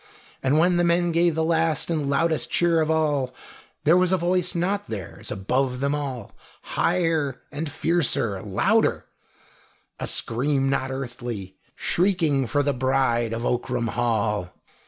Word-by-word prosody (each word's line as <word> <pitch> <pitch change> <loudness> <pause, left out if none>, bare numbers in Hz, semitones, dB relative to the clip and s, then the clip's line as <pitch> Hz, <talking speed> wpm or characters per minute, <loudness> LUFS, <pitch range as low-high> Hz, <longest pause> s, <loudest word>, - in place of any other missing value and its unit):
And 135 +3 +2
when 175 +2 +3
the 175 - +2
men 170 0 +2
gave 170 0 +2
the 160 - +1
last 165 0 +1
and 150 -4 -1
loudest 160 +3 +1
cheer 170 -2 +2
of 155 - 0
all 145 -5 0 0.5
there 160 +3 +5
was 180 0 +3
a 190 - +3
voice 180 +1 0
not 195 +4 -1
theirs, 100 -6 -6
above 125 +6 -1
them 140 +1 0
all, 135 -7 -4 0.3
higher, 165 -7 0 0.2
fiercer, 145 - 0
louder 100 -2 +1 0.9
a - - -3
scream 135 +3 +2
not 135 -1 -1
earthly, 120 -7 -6 0.2
shrieking 165 -8 +1
for 145 +5 +1
the 145 0 +1
bride 130 -3 +1
of 115 +1 -3
Ockram 120 -1 -1
Hall. 110 -6 0
140 Hz, 140 wpm, -24 LUFS, 120-165 Hz, 0.9 s, there